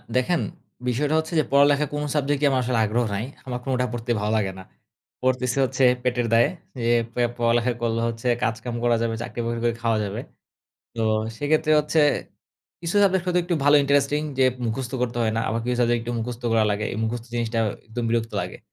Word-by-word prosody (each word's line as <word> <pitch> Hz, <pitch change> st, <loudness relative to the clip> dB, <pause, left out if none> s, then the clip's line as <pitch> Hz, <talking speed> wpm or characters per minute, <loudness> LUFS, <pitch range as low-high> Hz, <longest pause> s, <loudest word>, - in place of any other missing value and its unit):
দেখেন 160 Hz, +7 st, +2 dB, 0.5 s
বিষয়টা 145 Hz, +5 st, 0 dB
হচ্ছে 160 Hz, +2 st, -4 dB
যে -, -, +3 dB
পড়ালেখা 140 Hz, +1 st, +5 dB
কোন 145 Hz, 0 st, -2 dB
সাবজেক্টেই 145 Hz, 0 st, +2 dB
আমার 130 Hz, -1 st, +2 dB
আসলে 120 Hz, -1 st, 0 dB
আগ্রহ 115 Hz, +3 st, 0 dB
নাই। 105 Hz, +4 st, -2 dB, 0.2 s
আমার 125 Hz, -2 st, -4 dB
কোনটা 125 Hz, -1 st, 0 dB
পড়তেই 120 Hz, 0 st, -1 dB
ভালো 105 Hz, +1 st, 0 dB
লাগে 95 Hz, -3 st, 0 dB
না। -, -, -9 dB, 0.6 s
পড়তেছি 130 Hz, 0 st, 0 dB
হচ্ছে 130 Hz, -, -1 dB, 0.2 s
পেটের 125 Hz, -1 st, 0 dB
দায়ে, 115 Hz, +1 st, +5 dB, 0.3 s
যে 115 Hz, -, -1 dB, 0.3 s
প -, -, -31 dB, 0.2 s
পড়ালেখা 120 Hz, +1 st, +2 dB
করলে 115 Hz, 0 st, 0 dB
হচ্ছে 115 Hz, +1 st, -4 dB, 0.2 s
কাজকাম 115 Hz, 0 st, -2 dB
করা 120 Hz, -1 st, +3 dB
যাবে, 115 Hz, -1 st, 0 dB
চাকরিবাকরি 120 Hz, 0 st, -3 dB
করে 120 Hz, -1 st, +1 dB
খাওয়া 115 Hz, -1 st, +1 dB
যাবে। 100 Hz, -1 st, -4 dB, 0.8 s
তো 115 Hz, -, -1 dB, 0.3 s
সেইক্ষেত্রে 155 Hz, +3 st, +1 dB
হচ্ছে 150 Hz, +1 st, +1 dB, 0.8 s
কিছু 170 Hz, +2 st, -3 dB
সাবজেক্ট 190 Hz, -2 st, +3 dB
হয়তো 180 Hz, 0 st, +2 dB
একটু 175 Hz, 0 st, -1 dB
ভালো 145 Hz, +1 st, +6 dB
ইন্টারেস্টিং 140 Hz, +1 st, +2 dB, 0.2 s
যে 130 Hz, -, +5 dB, 0.2 s
মুখস্থ 120 Hz, +2 st, -3 dB
করতে 120 Hz, -1 st, -1 dB
হয় 110 Hz, -1 st, +1 dB
না -, -, +1 dB
আবার 115 Hz, -, -1 dB
কিছু 125 Hz, 0 st, 0 dB
সাবজেক্ট 120 Hz, 0 st, +2 dB
একটু 120 Hz, +1 st, -3 dB
মুখস্থ 120 Hz, +1 st, -5 dB
করা 115 Hz, -1 st, +4 dB
লাগে। 105 Hz, +1 st, -2 dB
এই -, -, -5 dB
মুখস্থ 115 Hz, +1 st, -3 dB
জিনিসটা 115 Hz, -1 st, -1 dB, 0.3 s
একদম 120 Hz, +2 st, -4 dB
বিরক্ত 115 Hz, 0 st, 0 dB
লাগে। -, -, -6 dB
120 Hz, 190 wpm, -24 LUFS, 115-140 Hz, 0.8 s, ভালো